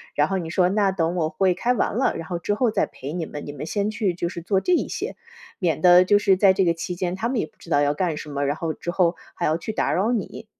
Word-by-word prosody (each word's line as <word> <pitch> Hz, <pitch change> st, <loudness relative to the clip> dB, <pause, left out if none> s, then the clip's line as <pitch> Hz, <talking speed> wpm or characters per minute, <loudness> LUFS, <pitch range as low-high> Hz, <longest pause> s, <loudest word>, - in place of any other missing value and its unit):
然 150 Hz, +1 st, +3 dB
后 195 Hz, -, -1 dB
你 165 Hz, -3 st, -4 dB
说： 180 Hz, +1 st, +2 dB
“那 200 Hz, -1 st, +2 dB
等 170 Hz, -1 st, -1 dB
我 160 Hz, -3 st, 0 dB
会 190 Hz, 0 st, +2 dB
开 240 Hz, +7 st, 0 dB
完 225 Hz, -, -1 dB
了， 260 Hz, -, +1 dB
然 165 Hz, -1 st, -7 dB
后 175 Hz, -, -3 dB
之 205 Hz, -, -1 dB
后 240 Hz, +1 st, +2 dB
再 -, -, +1 dB
陪 140 Hz, +4 st, -8 dB
你 170 Hz, -3 st, -3 dB
们， 145 Hz, -, -8 dB
你 145 Hz, -, -7 dB
们 145 Hz, +2 st, -6 dB
先 205 Hz, +4 st, -1 dB
去 210 Hz, -4 st, -1 dB
就 170 Hz, 0 st, -3 dB
是 170 Hz, -1 st, -6 dB
做 190 Hz, +2 st, +1 dB
这 360 Hz, -, +1 dB
一 -, -, +1 dB
些。” -, -, -4 dB, 0.4 s
免 165 Hz, -6 st, 0 dB
得 180 Hz, 0 st, +7 dB
就 205 Hz, +2 st, +4 dB
是 195 Hz, -2 st, +3 dB
在 195 Hz, -1 st, +5 dB
这 190 Hz, -1 st, +2 dB
个 170 Hz, -, +3 dB
期 175 Hz, +2 st, -5 dB
间， 180 Hz, 0 st, -2 dB
他 230 Hz, +5 st, -2 dB
们 260 Hz, -, -1 dB
也 -, -, 0 dB
不 -, -, -22 dB
知 170 Hz, -, -14 dB
道 145 Hz, -2 st, +3 dB
要 145 Hz, 0 st, +2 dB
干 165 Hz, -2 st, -1 dB
什 150 Hz, -, -7 dB
么， 140 Hz, 0 st, -2 dB
然 145 Hz, -, 0 dB
后 160 Hz, -1 st, -3 dB
之 -, -, -7 dB
后 175 Hz, -1 st, +2 dB, 0.2 s
还 175 Hz, -, -2 dB
要 155 Hz, +1 st, +2 dB
去 220 Hz, -, -5 dB
打 -, -, 0 dB
扰 205 Hz, +6 st, +1 dB
你。 235 Hz, -, -4 dB
180 Hz, 330 characters per minute, -23 LUFS, 165-200 Hz, 0.4 s, 得